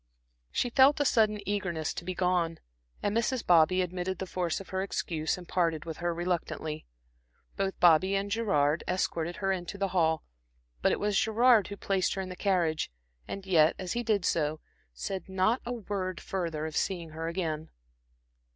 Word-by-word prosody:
She 245 Hz, -, -1 dB
felt 275 Hz, +3 st, +6 dB
a 290 Hz, -, +2 dB
sudden 215 Hz, -5 st, +2 dB
eagerness 185 Hz, -6 st, -1 dB
to -, -, -6 dB
be 185 Hz, +1 st, -4 dB
gone, 175 Hz, -3 st, +1 dB, 0.5 s
and 205 Hz, +1 st, 0 dB
Mrs. 235 Hz, +2 st, 0 dB
Bobby 175 Hz, +2 st, +5 dB
admitted 180 Hz, +1 st, -3 dB
the 190 Hz, -, -4 dB
force 180 Hz, -2 st, -2 dB
of 195 Hz, -, -11 dB
her 190 Hz, 0 st, -1 dB
excuse 165 Hz, -5 st, -2 dB
and 180 Hz, -1 st, -10 dB
parted 165 Hz, -3 st, 0 dB
with 160 Hz, -1 st, -5 dB
her 175 Hz, 0 st, -1 dB
reluctantly. 170 Hz, -3 st, -3 dB, 0.7 s
Both 195 Hz, -1 st, -2 dB
Bobby 175 Hz, +3 st, +5 dB
and 200 Hz, +1 st, -1 dB
Gerard 165 Hz, -9 st, +2 dB
escorted 175 Hz, -2 st, -1 dB
her 195 Hz, -1 st, -1 dB
into 185 Hz, +1 st, -3 dB
the 195 Hz, -1 st, 0 dB
hall, 160 Hz, -3 st, +2 dB, 0.6 s
but -, -, +3 dB
it -, -, 0 dB
was 205 Hz, -1 st, +2 dB
Gerard 220 Hz, -2 st, +4 dB
who 200 Hz, -, -7 dB
placed 195 Hz, -2 st, 0 dB
her 195 Hz, -, -2 dB
in 185 Hz, -, -7 dB
the 180 Hz, -, -6 dB
carriage, 175 Hz, -5 st, +1 dB, 0.4 s
and 195 Hz, -1 st, -6 dB
yet, 160 Hz, -4 st, +4 dB
as 185 Hz, -2 st, -4 dB
he 240 Hz, -, -1 dB
did 215 Hz, -6 st, +1 dB
so, 155 Hz, -1 st, 0 dB, 0.3 s
said 175 Hz, -, -5 dB
not 190 Hz, +6 st, +2 dB
a -, -, -2 dB
word 195 Hz, -5 st, -3 dB
further 165 Hz, -5 st, -3 dB
of 160 Hz, 0 st, -5 dB
seeing 170 Hz, -4 st, -1 dB
her 160 Hz, +1 st, -4 dB
again. 160 Hz, -3 st, -3 dB
185 Hz, 180 wpm, -29 LUFS, 165-200 Hz, 0.7 s, felt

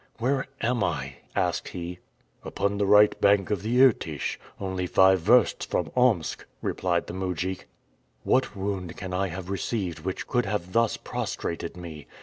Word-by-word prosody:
"Where 135 Hz, +4 st, 0 dB
am 120 Hz, -2 st, +1 dB
I?" -, -, -2 dB, 0.2 s
asked -, -, 0 dB
he. 90 Hz, 0 st, -6 dB, 0.4 s
"Upon 100 Hz, 0 st, -1 dB
the 100 Hz, -, +2 dB
right 105 Hz, +1 st, +5 dB
bank 100 Hz, -1 st, +4 dB
of 105 Hz, -, 0 dB
the 115 Hz, +4 st, 0 dB
Irtych, 80 Hz, -, +1 dB, 0.2 s
only 95 Hz, -2 st, -2 dB
five 95 Hz, +1 st, +5 dB
versts 115 Hz, +7 st, +4 dB
from -, -, -2 dB
Omsk," 115 Hz, -11 st, +2 dB, 0.2 s
replied 85 Hz, -2 st, 0 dB
the -, -, -7 dB
mujik. 95 Hz, 0 st, -3 dB, 0.6 s
"What 130 Hz, -4 st, +1 dB
wound 95 Hz, -3 st, -4 dB
can 95 Hz, 0 st, -5 dB
I 95 Hz, +1 st, +1 dB
have 95 Hz, +1 st, -6 dB
received 95 Hz, -3 st, -2 dB
which 95 Hz, -, -4 dB
could 125 Hz, -4 st, 0 dB
have 95 Hz, -3 st, -3 dB
thus 115 Hz, -1 st, +2 dB
prostrated 85 Hz, +1 st, -4 dB
me? 80 Hz, -4 st, -9 dB
95 Hz, 155 wpm, -26 LUFS, 90-105 Hz, 0.6 s, right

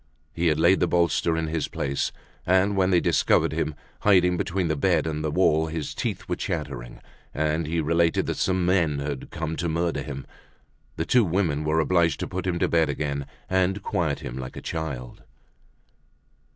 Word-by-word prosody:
He 85 Hz, +1 st, 0 dB
had 75 Hz, -1 st, +2 dB
laid 85 Hz, +4 st, +5 dB
the -, -, +2 dB
bolster 85 Hz, -1 st, +2 dB
in 80 Hz, -, 0 dB
his 80 Hz, 0 st, -2 dB
place. 70 Hz, 0 st, -2 dB, 0.3 s
And 95 Hz, +3 st, +3 dB
when 95 Hz, -1 st, +2 dB
they 90 Hz, -2 st, +4 dB
discovered 85 Hz, -3 st, +2 dB
him, 75 Hz, 0 st, -2 dB, 0.2 s
hiding 90 Hz, -3 st, +4 dB
between 95 Hz, -1 st, -1 dB
the 80 Hz, -, 0 dB
bed 80 Hz, +1 st, +2 dB
and 75 Hz, -1 st, -3 dB
the 80 Hz, -, 0 dB
wall, 80 Hz, -1 st, +3 dB
his 80 Hz, -2 st, -4 dB
teeth -, -, -3 dB
were -, -, -1 dB
chattering, -, -, -5 dB, 0.3 s
and 75 Hz, +1 st, 0 dB
he 85 Hz, +2 st, -1 dB
related 85 Hz, +2 st, +2 dB
that -, -, -3 dB
some 95 Hz, -1 st, +1 dB
men 85 Hz, -5 st, +2 dB
had 70 Hz, -1 st, -4 dB
come 80 Hz, 0 st, -4 dB
to 85 Hz, -, -1 dB
murder 85 Hz, -2 st, -1 dB
him. 70 Hz, -2 st, -6 dB, 0.7 s
The -, -, -2 dB
two 125 Hz, -2 st, +4 dB
women 85 Hz, -5 st, 0 dB
were 75 Hz, +1 st, +1 dB
obliged 85 Hz, 0 st, +2 dB
to -, -, -2 dB
put 95 Hz, +1 st, -4 dB
him 90 Hz, -1 st, 0 dB
to -, -, +1 dB
bed 80 Hz, -2 st, +2 dB
again 70 Hz, -1 st, -2 dB, 0.2 s
and 95 Hz, +2 st, +1 dB
quiet 85 Hz, -8 st, -1 dB
him 65 Hz, +1 st, -6 dB
like 65 Hz, -1 st, -7 dB
a -, -, -3 dB
child. 70 Hz, -7 st, -5 dB
80 Hz, 190 wpm, -25 LUFS, 75-90 Hz, 0.7 s, laid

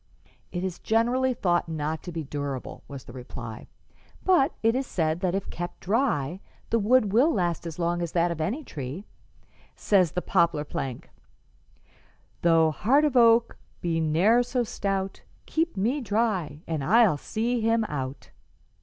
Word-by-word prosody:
"It 180 Hz, 0 st, -3 dB
is 185 Hz, -2 st, -3 dB
generally 245 Hz, +4 st, +2 dB
thought 175 Hz, -5 st, +1 dB
not 155 Hz, 0 st, -3 dB
to 175 Hz, -, -7 dB
be 165 Hz, -1 st, -4 dB
durable," 140 Hz, -2 st, -5 dB
was 140 Hz, -2 st, -8 dB
the 120 Hz, -, -12 dB
reply, 120 Hz, -3 st, -8 dB, 0.6 s
"but 345 Hz, -6 st, +4 dB
it 225 Hz, +1 st, +4 dB
is 265 Hz, +1 st, -1 dB
said 160 Hz, -1 st, 0 dB
that 185 Hz, -1 st, 0 dB
if 195 Hz, -, -3 dB
kept 175 Hz, 0 st, -6 dB
dry 190 Hz, -, 0 dB, 0.3 s
the 230 Hz, -, +3 dB
wood 215 Hz, -1 st, +3 dB
will 265 Hz, +9 st, +5 dB
last 175 Hz, -, -1 dB
as 160 Hz, -, -7 dB
long 175 Hz, 0 st, 0 dB
as 170 Hz, -2 st, -3 dB
that 175 Hz, 0 st, +2 dB
of 165 Hz, -2 st, -4 dB
any 235 Hz, -, -2 dB
tree. 145 Hz, -, -6 dB, 0.7 s
Says 185 Hz, -6 st, +2 dB
the 180 Hz, -, -1 dB
poplar 170 Hz, -5 st, +2 dB
plank, 130 Hz, -4 st, -5 dB, 1.3 s
"'Though 165 Hz, -2 st, +4 dB
heart 270 Hz, -, +3 dB
of 290 Hz, -3 st, 0 dB
oak 230 Hz, -1 st, +5 dB, 0.2 s
be 165 Hz, -2 st, -1 dB
ne'er 170 Hz, +10 st, +3 dB
so 245 Hz, 0 st, -1 dB
stout, 195 Hz, -3 st, -3 dB, 0.2 s
Keep 325 Hz, -6 st, -1 dB
me 240 Hz, +9 st, 0 dB
dry 200 Hz, -, -1 dB
and 160 Hz, -4 st, -3 dB
I'll 215 Hz, -, +5 dB
see 230 Hz, -, -2 dB
him 225 Hz, +1 st, +2 dB
out.' 135 Hz, -7 st, -5 dB
180 Hz, 160 wpm, -26 LUFS, 160-230 Hz, 1.3 s, will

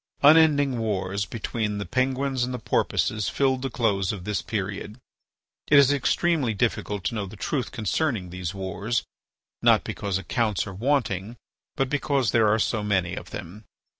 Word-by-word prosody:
Unending 145 Hz, -4 st, +5 dB
wars 100 Hz, -2 st, -1 dB
between 105 Hz, -1 st, -3 dB
the 100 Hz, -, -3 dB
Penguins 130 Hz, 0 st, 0 dB
and 125 Hz, -, -2 dB
the 125 Hz, -, -3 dB
Porpoises 110 Hz, -2 st, 0 dB
filled 130 Hz, -2 st, +1 dB
the 135 Hz, -, -2 dB
close 100 Hz, -6 st, 0 dB
of 95 Hz, -4 st, -6 dB
this 105 Hz, +1 st, -2 dB
period. 100 Hz, 0 st, -4 dB, 0.7 s
It 145 Hz, -, +6 dB
is 140 Hz, 0 st, +6 dB
extremely 145 Hz, -3 st, +1 dB
difficult 105 Hz, -2 st, -1 dB
to -, -, -1 dB
know 105 Hz, -3 st, -3 dB
the 95 Hz, -, -10 dB
truth 130 Hz, +5 st, -2 dB
concerning 110 Hz, -, -1 dB
these 90 Hz, -2 st, -4 dB
wars, 95 Hz, +3 st, -2 dB, 0.6 s
not -, -, +5 dB
because 100 Hz, -3 st, -2 dB
accounts 105 Hz, 0 st, -1 dB
are 100 Hz, -, -7 dB
wanting, 115 Hz, -2 st, -1 dB, 0.4 s
but 135 Hz, -3 st, +1 dB
because 140 Hz, -3 st, 0 dB
there 115 Hz, -2 st, +4 dB
are 105 Hz, +1 st, +3 dB
so 110 Hz, 0 st, 0 dB
many 95 Hz, -4 st, 0 dB
of -, -, -7 dB
them. 105 Hz, +6 st, -8 dB
110 Hz, 165 wpm, -25 LUFS, 100-130 Hz, 0.7 s, It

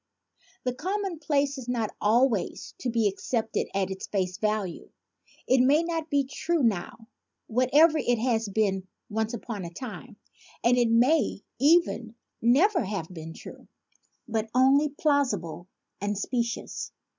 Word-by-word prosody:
The 250 Hz, -, -1 dB
commonplace 310 Hz, -5 st, -1 dB
is 250 Hz, -, -9 dB
not 230 Hz, -4 st, -1 dB
always 225 Hz, 0 st, +1 dB
to 255 Hz, -, -2 dB
be 230 Hz, -2 st, +1 dB
ac 200 Hz, -1 st, 0 dB
cepted 225 Hz, -3 st, -1 dB
at 195 Hz, -1 st, 0 dB
its 190 Hz, -, -6 dB
face 185 Hz, -2 st, -2 dB
value. 210 Hz, -4 st, -2 dB, 0.6 s
It 260 Hz, 0 st, +4 dB
may 285 Hz, +6 st, +4 dB
not 330 Hz, -2 st, -3 dB
be 285 Hz, -1 st, +2 dB
true 315 Hz, +3 st, -1 dB
now, 225 Hz, +1 st, -1 dB, 0.4 s
whatever 285 Hz, +7 st, +4 dB
it 245 Hz, -3 st, +1 dB
has 225 Hz, -2 st, 0 dB
been 195 Hz, -2 st, 0 dB, 0.2 s
once 220 Hz, +2 st, -1 dB
upon 215 Hz, -3 st, -6 dB
a 170 Hz, -, -5 dB
time; 220 Hz, +2 st, -9 dB, 0.5 s
and 240 Hz, +1 st, +4 dB
it 240 Hz, -2 st, +3 dB
may 240 Hz, -1 st, +3 dB, 0.2 s
even 275 Hz, -6 st, +3 dB, 0.3 s
never 310 Hz, -, +4 dB
have 190 Hz, -4 st, -4 dB
been 160 Hz, -1 st, -8 dB
true, -, -, -11 dB, 0.6 s
but 225 Hz, -1 st, -2 dB
only 275 Hz, +4 st, +5 dB
plausible 255 Hz, -, 0 dB, 0.3 s
and 205 Hz, 0 st, -1 dB
specious. 235 Hz, +2 st, -3 dB
235 Hz, 140 wpm, -27 LUFS, 210-280 Hz, 0.6 s, only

